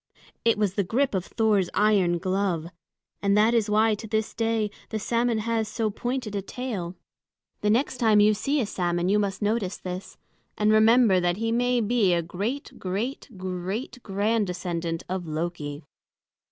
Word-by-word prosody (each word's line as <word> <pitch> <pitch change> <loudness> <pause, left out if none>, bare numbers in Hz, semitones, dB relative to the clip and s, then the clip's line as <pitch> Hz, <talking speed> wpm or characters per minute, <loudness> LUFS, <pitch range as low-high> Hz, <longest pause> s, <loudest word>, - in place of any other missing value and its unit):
It 230 -2 +3
was 205 -3 +1
the 200 - +1
grip 255 +8 0
of 190 -2 0
Thor's 210 -5 +2
iron 200 -5 +3
glove; 185 -2 -1 0.6
and 200 0 +3
that 220 +3 +4
is 225 -3 +2
why 215 +1 +4
to 215 +2 -6
this 220 0 -1
day 225 -2 0 0.2
the 220 - -2
salmon 235 +2 0
has 225 0 -1
so 215 0 -1
pointed 240 -1 -3
a 200 - -1
tail. 200 -5 -5 0.7
The 210 - +1
next 250 +4 +1
time 220 -3 +4
you 210 +1 +6
see 275 +8 0
a 245 - +1
salmon 175 -3 -1
you 210 +1 +3
must 200 0 -2
notice 205 -2 0
this, 185 +1 -7 0.4
and 210 0 +3
remember 220 -2 +5
that 175 0 0
he 225 +1 -1
may 245 +1 +2
be 210 -5 +2
a 170 - 0
great 205 - -4
great 210 +11 -3
great 185 +7 -4
grand 210 +1 0
descendant 170 -2 -3
of 185 -2 -4
Loki. 155 -2 -4
210 Hz, 170 wpm, -26 LUFS, 185-225 Hz, 0.7 s, you